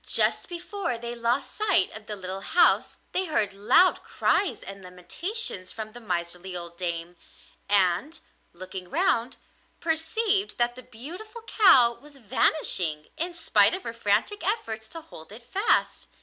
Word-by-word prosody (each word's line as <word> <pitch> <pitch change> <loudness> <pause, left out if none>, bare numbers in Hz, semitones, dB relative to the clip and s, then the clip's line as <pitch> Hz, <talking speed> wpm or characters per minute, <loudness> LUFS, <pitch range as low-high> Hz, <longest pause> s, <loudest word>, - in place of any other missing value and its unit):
Just - - +2
before 350 - -4
they 235 +1 -6
lost 240 +2 -1
sight 400 - +2
of 220 0 -9
the 210 - -4
little 190 0 -6
house 345 - +3
they 375 - 0
heard 215 - 0
loud 235 - +4
cries 400 - 0
and 195 0 -9
lamentations 185 - -3
from 215 -1 -7
the 240 - -10
miserly 180 -2 -4
old 170 -1 -7
dame, 170 -1 -4 0.5
and, 200 - +2 0.3
looking 185 +1 -9
round, 270 -8 +1 0.4
perceived 390 +6 0
that 240 0 +1
the 255 - -8
beautiful 350 - -9
cow 265 - +6
was 290 -1 -13
vanishing 195 - +1
in 345 +2 -4
spite 215 -11 +4
of 380 - -7
her 230 - -5
frantic 230 - 0
efforts 225 - -2
to 330 - -8
hold 160 - -13
it 225 +3 -11
fast. 390 - +1
235 Hz, 150 wpm, -26 LUFS, -, 0.5 s, cow